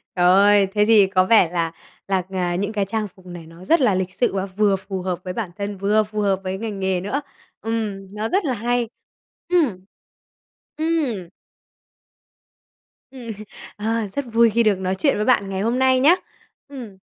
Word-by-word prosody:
Trời 175 - +2
ơi! 200 +2 +5
Thế 210 0 +3
thì 210 -3 +5
có 185 -1 +2
vẻ 200 -5 +5
là 165 -2 -1 0.4
là, 190 -2 0
à, 180 -2 -1
những 200 +4 -2
cái 200 -2 0
trang 215 +1 -2
phục 185 -1 -21
này 175 -2 -9
nó 170 +3 -14
rất 330 -3 +3
là 210 -7 +3
lịch 185 0 -2
sự 245 - 0
và 195 0 -1
vừa 200 +1 +1
phù 190 0 -6
hợp 180 -1 -3
với 185 - -5
bản 195 -4 -4
thân, 200 -1 -4
vừa 210 +3 +2
phù 215 0 -6
hợp 195 -2 +1
với 190 0 -3
ngành 210 -2 -5
nghề 190 -2 0
nữa. 265 +9 -2 0.4
Ừm, 210 -4 -4
nó 215 +1 -2
rất 385 -2 +1
là 260 - 0
hay! 240 +1 -1 0.6
Ừm, 250 - +1 0.9
ừm. 290 - -1 1.8
Ừm. 245 -4 -8 0.5
Ờ, 220 0 -1
rất 280 - -2
vui 230 0 +5
khi 235 +2 +2
được 205 -3 +2
nói 190 0 -1
chuyện 275 +8 +1
với 210 - -1
bạn 210 -6 +2
ngày 190 0 -3
hôm 235 +4 0
nay 260 -1 +4
nhá, 310 +7 +6 0.5
ừm. 245 -9 -10
205 Hz, 195 wpm, -21 LUFS, 190-230 Hz, 1.8 s, nhá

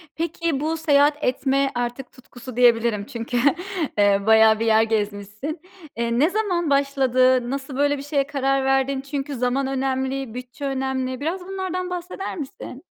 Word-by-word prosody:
Peki, 335 -2 -2
bu 315 +3 -1
seyahat 295 -1 +3
etme 270 +1 +1
artık 245 +2 -3
tutkusu 255 -1 -12
diyebilirim, 230 -4 +3
çünkü, 240 0 -4 0.6
eee, 200 -1 +4
bayağı 220 0 +6
bir 230 - 0
yer 220 0 +5
gezmişsin. 215 - -3 0.4
Eee, 235 0 0
ne 305 +5 +4
zaman 370 -6 -1
başladı? 260 -3 +2
Nasıl 270 0 -4
böyle 285 0 +2
bir 275 - -7
şeye 280 -1 0
karar 275 -1 0
verdin? 270 0 +1
Çünkü 275 0 -4
zaman 250 +2 0
önemli, 265 -2 -2
bütçe 250 +3 -7
önemli. 265 -1 -2
Biraz 335 +6 -2
bunlardan 370 -1 -3
bahseder 360 +2 -5
misin? 275 -1 -8
270 Hz, 150 wpm, -23 LUFS, 245-290 Hz, 0.6 s, bayağı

